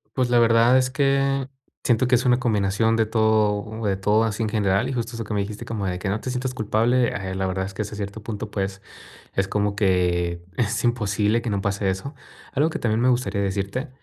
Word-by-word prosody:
Pues, 130 -2 +1
la 120 -1 +4
verdad 115 +2 +5
es 130 -1 +2
que, 135 -1 +1 0.3
siento 120 +1 +2
que 125 - +4
es 120 - +1
una 125 -1 +3
combinación 110 -1 +1
de 110 -1 +2
todo, 110 0 +1
de 100 -2 +1
todo 105 +3 +2
así 115 0 -1
en - - 0
general, 105 +1 +1
y 135 - -3
justo 120 -2 -3
eso 115 -1 -5
que 105 - -5
me 100 - +1
dijiste 105 +1 -6
como 110 -3 -3
de 90 -1 -3
que: 95 - -4
"No 100 +3 -1
te - - -4
sientas 130 +1 -2
culpable", 120 +2 +2
eh, 95 -2 -4
la 95 0 -1
verdad 95 0 -2
es 100 - -7
que 100 - -4
hasta 105 0 -5
cierto 100 +1 -6
punto, 105 -1 -5
pues, 95 -1 -3 0.5
es 95 - +1
como 100 0 -1
que 90 -3 +1
es 115 -1 0
imposible 110 -1 +1
que 120 - -4
no 100 -2 0
pase 100 0 0
eso. 140 +10 -5 0.4
Algo 150 +4 +2
que - - -5
también 110 -1 +1
me 125 - +3
gustaría 115 -5 +1
decirte 100 +7 -2
110 Hz, 230 wpm, -23 LUFS, 100-120 Hz, 0.5 s, verdad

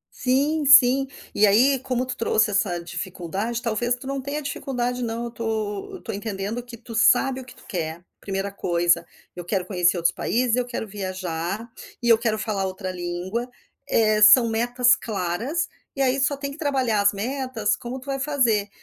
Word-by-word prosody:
Sim 285 +4 +1
sim, 270 0 +7 0.3
e 210 - +5
aí 255 +7 +4
como 255 -1 -2
tu 260 - -4
trouxe 220 -2 +2
essa 195 -3 +1
dificuldade, 190 +6 -4
talvez 240 0 0
tu 250 - -12
não 275 0 -2
tenha 285 +3 -4
dificuldade 250 -3 -3
não, 230 0 -3
eu 240 - -3
estou 220 -3 -3
eu - - -7
estou - - -6
entendendo 205 +2 -4
que 240 -1 -11
tu 230 0 -11
sabe 255 +4 +4
o - - -9
que - - -13
tu - - -19
quer, 165 -1 -4 0.2
1º 195 0 -3
coisa. 170 -2 +1 0.3
Eu 175 - -6
quero 185 +1 -2
conhecer 180 -1 +2
outros 170 -1 +1
países 240 +2 0
eu 250 0 0
quero 235 -2 -4
viajar, 185 0 -4 0.4
e 235 - +2
eu 225 - +7
quero 220 -2 0
falar 205 -3 -2
outra 190 0 -5
língua, 180 +7 -4 0.4
eh, 215 -3 +3
são 230 +2 +8
metas 245 +3 +3
claras, 220 - -2 0.3
e 275 - +1
aí 265 +1 +2
só 280 +2 +1
tem 280 0 -5
que 285 - -12
trabalhar 265 -8 +1
as 200 0 +3
metas, 235 -1 -1
como 245 +2 -6
tu 260 - -13
vai 275 -1 -3
fazer. 245 -8 +1
225 Hz, 190 wpm, -24 LUFS, 195-255 Hz, 0.4 s, são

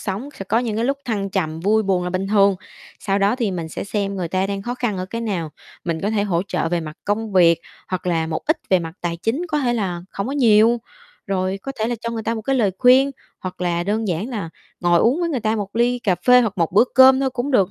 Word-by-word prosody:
sống 205 +7 -4
sẽ 195 - -5
có 220 +4 +1
những 235 -3 -2
cái 225 - 0
lúc 275 +2 0
thăng 200 -4 -2
trầm, 160 -5 -2
vui 215 +5 +2
buồn 190 -3 0
là 180 - -2
bình 185 +1 -2
thường, 200 -2 +4 0.4
sau 195 -1 0
đó 200 +4 +2
thì 230 -6 0
mình 170 -3 -4
sẽ - - -5
xem 200 -1 -2
người 180 -3 -3
ta 185 +2 0
đang 200 0 -4
khó 240 +4 -3
khăn 240 -5 -2
ở 185 - -3
cái 230 +4 -5
nào, 185 -9 -3 0.3
mình 165 -2 -2
có 205 - -1
thể 215 -2 +1
hỗ 180 -4 0
trợ - - -1
về 175 0 0
mặt 155 -1 -8
công 210 +1 -2
việc, 170 -3 +5 0.3
hoặc 185 -1 -4
là 165 -2 +1
một 160 0 -3
ít 315 - +3
về 185 - +5
mặt 165 -2 -6
tài 170 -1 -2
chính, 225 - -1
có 300 -2 0
thể 250 -4 +1
là 190 -6 -2
hổng 200 - -3
có 265 - -3
nhiều, 230 -3 +4 0.5
rồi 190 -1 -1
có 275 - -5
thể 220 - 0
là 240 - -1
cho 230 - -3
người 225 -1 -4
ta 230 - -1
một 220 - -5
cái 270 +5 0
lời 215 -6 +2
khuyên, 260 +2 +5 0.3
hoặc 185 -1 -7
là 175 -1 0
đơn 215 +2 -1
giản 180 +7 -2
là 210 -9 -4 0.3
ngồi 175 -1 +3
uống 260 +9 +2
với 340 - 0
người 275 -7 -1
ta 220 0 0
một 205 +1 -5
ly 245 +1 +2
cà 200 -6 +1
phê 250 0 +8
hoặc 225 -5 0
một 165 -1 +1
bữa 205 +5 +6
cơm 260 0 +7
thôi 270 -1 +1
cũng 250 +2 -3
được 200 -8 +3
205 Hz, 280 wpm, -21 LUFS, 185-235 Hz, 0.5 s, phê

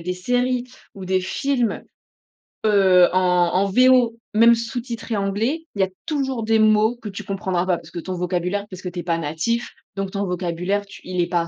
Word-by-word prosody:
des 180 +2 -2
séries 245 +6 0 0.3
ou 190 -1 -8
des 185 0 +1
films, 245 +2 -1 0.8
heu, 190 -4 +5
en 185 - +4 0.3
en 190 +2 +3
VO 250 +1 +4 0.2
même 230 +2 +6
sous-titré 230 -1 -4
anglais, 220 +11 -1
il 200 - 0
y - - +5
a - - -8 0.2
toujours 270 -6 -1
des 225 0 +2
mots 215 +2 +4
que 215 - -7
tu 195 - -7
comprendras 190 -3 -2
pas 180 - +2
parce 165 -1 -14
que 170 - -5
ton 185 +3 -5
vocabulaire 180 +3 -2
parce 185 -1 -9
que 180 - -4
tu 175 0 -7
es - - -4
pas 170 -1 0
natif, 160 +10 -2 0.3
donc 195 -1 -3
ton 200 0 -2
vocabulaire 180 +2 -2
tu 200 - -13
il 180 -1 -2
est 170 - 0
pas 175 -1 +1
à 170 - -4
200 Hz, 210 wpm, -22 LUFS, 180-230 Hz, 0.8 s, même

